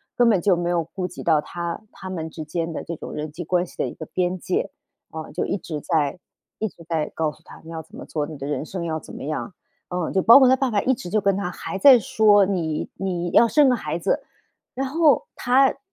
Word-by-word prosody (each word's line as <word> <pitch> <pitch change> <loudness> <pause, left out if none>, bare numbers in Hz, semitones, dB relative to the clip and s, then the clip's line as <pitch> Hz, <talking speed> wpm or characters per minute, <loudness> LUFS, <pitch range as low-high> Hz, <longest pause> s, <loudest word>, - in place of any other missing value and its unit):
根 240 -1 +4
本 205 -5 +4
就 190 -2 +3
没 175 0 -2
有 175 -1 +2
顾 185 -2 -3
及 180 - -9
到 155 -3 +3
他 170 +4 -5
他 190 - -9
们 165 -3 -4
之 160 0 -7
间 165 +2 -3
的 - - -5
这 170 - -4
种 - - -8
人 150 0 -5
际 175 +3 -6
关 180 +2 +1
系 - - -16
的 - - 0
一 - - -6
个 160 - -8
边 180 +2 -1
界。 180 - -2 0.4
啊， 160 -1 -7
就 170 - -1
一 - - -1
直 155 -5 -6
在 150 0 0 0.4
一 220 - -2
直 170 -2 -17
在 160 -3 -1
告 155 -2 -1
诉 - - -23
她， - - -13
你 - - -11
要 165 -1 -5
怎 160 - -23
么 - - -8
做， 150 -2 -2
你 155 -2 -8
的 135 - -6
人 145 0 -2
生 175 0 -5
要 160 -1 -2
怎 - - -11
么 - - -8
样。 155 +5 -4 0.4
嗯， 180 -2 -2
就 190 - +3
包 230 +7 +9
括 260 - +6
她 260 - +6
爸 260 -1 -1
爸 210 - +2
一 260 - +3
直 180 -7 -6
就 215 +4 +2
跟 200 -2 +2
她 195 -2 -2
还 190 - -5
在 260 +2 +8
说： 205 -2 +4
“你 165 -6 -2
你 175 -2 -2
要 - - +6
生 285 +4 +4
个 250 - +4
孩 - - -4
子。” - - 0 0.5
然 270 +1 -2
后 310 +1 +3
她 260 +2 +4
她， - - -7
180 Hz, 285 characters per minute, -23 LUFS, 160-210 Hz, 0.5 s, 包